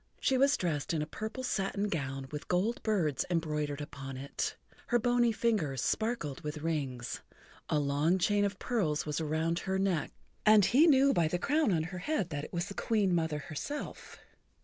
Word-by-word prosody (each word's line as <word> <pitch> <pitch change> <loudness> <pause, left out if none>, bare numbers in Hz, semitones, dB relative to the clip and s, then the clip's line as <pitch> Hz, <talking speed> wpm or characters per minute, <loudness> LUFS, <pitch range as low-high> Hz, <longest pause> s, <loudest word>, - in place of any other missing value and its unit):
She 265 - +2
was 275 +2 +4
dressed 165 -3 -1
in 150 - 0
a - - -3
purple 220 +10 -5
satin 200 -3 -1
gown 135 -6 -3
with 150 -1 -6
gold 195 +7 0
birds 175 - +1
embroidered 150 -4 -1
upon 135 -2 -7
it, 140 +1 -3 0.3
her 240 - +3
bony 240 0 +3
fingers 205 - 0
sparkled 220 - -1
with 150 0 -4
rings, 135 -7 -2 0.5
a - - +2
long 145 +5 +2
chain 205 +3 +2
of 200 -1 -1
pearls 180 -13 0
was 150 +1 -2
around 160 +2 0
her 190 0 -1
neck, 190 -5 0 0.3
and 215 -2 +7
he 290 - +5
knew 275 -2 +5
by 170 -3 +3
the 180 - 0
crown 295 - +2
on 160 -3 +2
her 180 +2 -6
head 195 - -1
that 145 -1 -3
it - - -8
was 175 0 -1
the 200 - -7
Queen 205 -3 +1
Mother 160 -3 +1
herself. 155 - -6
175 Hz, 185 wpm, -31 LUFS, 150-215 Hz, 0.5 s, and